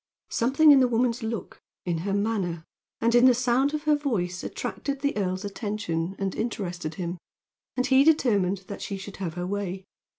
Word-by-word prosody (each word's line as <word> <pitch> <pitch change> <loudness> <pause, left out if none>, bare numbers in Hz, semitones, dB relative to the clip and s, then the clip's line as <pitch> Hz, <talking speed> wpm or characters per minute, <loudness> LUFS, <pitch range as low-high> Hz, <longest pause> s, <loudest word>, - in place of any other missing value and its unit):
Something 275 +6 +5
in 280 - +8
the 255 - +4
woman's 240 0 +1
look, 225 -1 -5 0.2
in 170 -2 -1
her 195 +4 -3
manner, 195 -6 -1 0.4
and 230 +1 +2
in 240 +1 +6
the 250 - +6
sound 255 +4 +2
of 300 - -4
her 305 -1 +4
voice 195 -12 -2
attracted 280 -1 -4
the 285 0 0
earl's 190 -1 -2
attention 195 -4 -3
and 195 -1 -2
interested 180 -8 -4
him, 175 0 -4 0.6
and 255 - +2
he 265 +1 +5
determined 205 - +2
that 200 - -7
she 200 - -4
should 195 +1 -9
have 175 -4 -4
her 175 0 -3
way. 190 -1 -3
205 Hz, 185 wpm, -26 LUFS, 185-250 Hz, 0.6 s, in